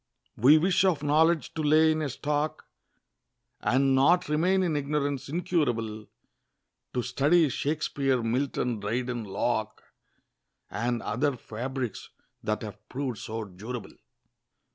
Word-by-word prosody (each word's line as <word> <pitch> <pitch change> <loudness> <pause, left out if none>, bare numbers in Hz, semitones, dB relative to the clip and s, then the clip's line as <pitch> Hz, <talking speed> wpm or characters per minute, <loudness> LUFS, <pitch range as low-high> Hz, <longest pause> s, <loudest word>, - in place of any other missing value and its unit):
We 140 +7 +6
wish 180 +4 +3
of 170 -6 +2
knowledge 160 +2 +2
to 160 - -3
lay 155 +1 +5
in 155 0 -1
a 150 - -1
stock, 150 +3 -2 0.9
And 135 +1 +2
not 175 +7 +4
remain 180 +5 +2
in 165 -4 0
ignorance 145 -1 -1
incurable; 120 - -1 0.9
To 125 - +1
study 155 +6 +3
Shakspeare, 140 -2 0
Milton, 125 -1 -1
Dryden, 120 +3 -2
Locke, 110 +2 -2 0.9
And 120 +1 -1
other 130 +5 0
fabrics 125 +1 -5 0.3
that 110 +1 -2
have 105 0 -10
proved 130 -4 -3
so 110 0 -5
durable. 105 +5 -7
135 Hz, 120 wpm, -28 LUFS, 115-155 Hz, 0.9 s, We